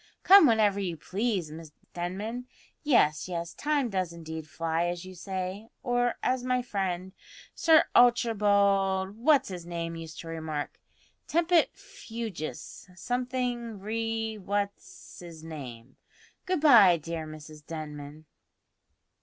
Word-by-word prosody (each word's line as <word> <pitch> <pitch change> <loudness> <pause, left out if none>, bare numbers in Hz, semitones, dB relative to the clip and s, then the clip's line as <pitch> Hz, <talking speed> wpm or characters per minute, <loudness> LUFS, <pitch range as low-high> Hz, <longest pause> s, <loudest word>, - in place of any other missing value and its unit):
Come 390 -4 +9
whenever 215 -4 +3
you 180 -4 -3
please, 195 +1 -2
dear 155 +2 -8
Mrs 160 -2 -12 0.2
Denman. 205 +8 -4 0.3
Yes, 185 - +2
yes, 170 -1 -4
time 295 -3 0
does 185 -3 -1
indeed 160 -2 -8
fly, 165 +2 -1
as 175 +1 -4
you 185 - -9
say; 190 +3 -5 0.2
or 245 -1 +1
as 255 -1 0
my 250 0 0
friend, 190 -4 -3 0.4
Sir 320 -1 +5
Archibald 200 -5 +3
What's 275 +3 +3
his 180 -2 -6
name 170 -1 -4
used 165 -1 -8
to 165 - -11
remark, 160 -2 -5 0.5
`Tempit 340 0 +2
fugus 205 - -7
something 245 +1 -2
re 225 +1 -3
what's 200 0 -5
'is 165 -2 -11
name.' 130 -6 -9 0.5
Good 365 -4 0
bye, 220 - +7
dear 160 0 -5
Mrs 155 0 -11
Denman." 150 -1 -8
190 Hz, 125 wpm, -28 LUFS, 165-235 Hz, 0.5 s, Come